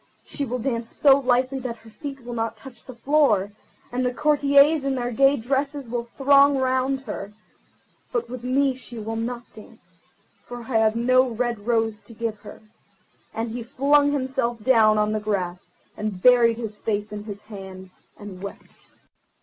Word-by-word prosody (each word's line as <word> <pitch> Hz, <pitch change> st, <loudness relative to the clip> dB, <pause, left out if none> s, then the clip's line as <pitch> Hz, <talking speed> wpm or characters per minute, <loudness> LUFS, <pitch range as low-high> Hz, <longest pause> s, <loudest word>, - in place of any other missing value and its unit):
She 285 Hz, -, -4 dB
will 250 Hz, 0 st, -3 dB
dance 235 Hz, -2 st, -3 dB
so 280 Hz, -1 st, +5 dB
lightly 260 Hz, +1 st, +1 dB
that 240 Hz, -2 st, -5 dB
her 225 Hz, 0 st, -17 dB
feet 275 Hz, 0 st, -8 dB
will 240 Hz, -, -6 dB
not 225 Hz, -1 st, -3 dB
touch 260 Hz, +2 st, -13 dB
the 255 Hz, -, -10 dB
floor, 235 Hz, -7 st, +2 dB, 0.4 s
and 250 Hz, +1 st, -1 dB
the 250 Hz, -, +1 dB
courtiers 285 Hz, +2 st, +4 dB
in 275 Hz, -1 st, 0 dB
their 245 Hz, -1 st, -2 dB
gay 275 Hz, +4 st, +4 dB
dresses 275 Hz, +2 st, -2 dB
will 235 Hz, -1 st, -3 dB
throng 280 Hz, 0 st, +5 dB
round 260 Hz, +1 st, 0 dB
her. 205 Hz, -6 st, -7 dB, 0.8 s
But 470 Hz, -2 st, -1 dB
with 250 Hz, 0 st, -8 dB
me 265 Hz, +2 st, +2 dB
she 250 Hz, -2 st, -11 dB
will 225 Hz, +1 st, -4 dB
not 235 Hz, +2 st, -4 dB
dance, 195 Hz, -6 st, -17 dB, 0.4 s
for 245 Hz, 0 st, -8 dB
I 235 Hz, 0 st, -1 dB
have 220 Hz, 0 st, +2 dB
no 255 Hz, +2 st, +3 dB
red 235 Hz, -2 st, -3 dB
rose 225 Hz, -2 st, 0 dB
to 230 Hz, -, -15 dB
give 225 Hz, -2 st, -3 dB
her"; -, -, -12 dB, 0.7 s
and 225 Hz, 0 st, -4 dB
he 240 Hz, +1 st, -5 dB
flung 285 Hz, +4 st, +2 dB
himself 260 Hz, -5 st, -2 dB
down 220 Hz, -4 st, +5 dB
on 210 Hz, 0 st, +1 dB
the 215 Hz, -, -1 dB
grass, 180 Hz, -4 st, -3 dB, 0.2 s
and 210 Hz, -3 st, -4 dB
buried 235 Hz, +1 st, +5 dB
his 220 Hz, -3 st, -6 dB
face 210 Hz, -1 st, -3 dB
in 210 Hz, 0 st, -7 dB
his 205 Hz, -1 st, -8 dB
hands, 190 Hz, -3 st, -10 dB, 0.2 s
and 195 Hz, -3 st, -10 dB
wept. 200 Hz, -, -11 dB
240 Hz, 175 wpm, -24 LUFS, 215-265 Hz, 0.8 s, so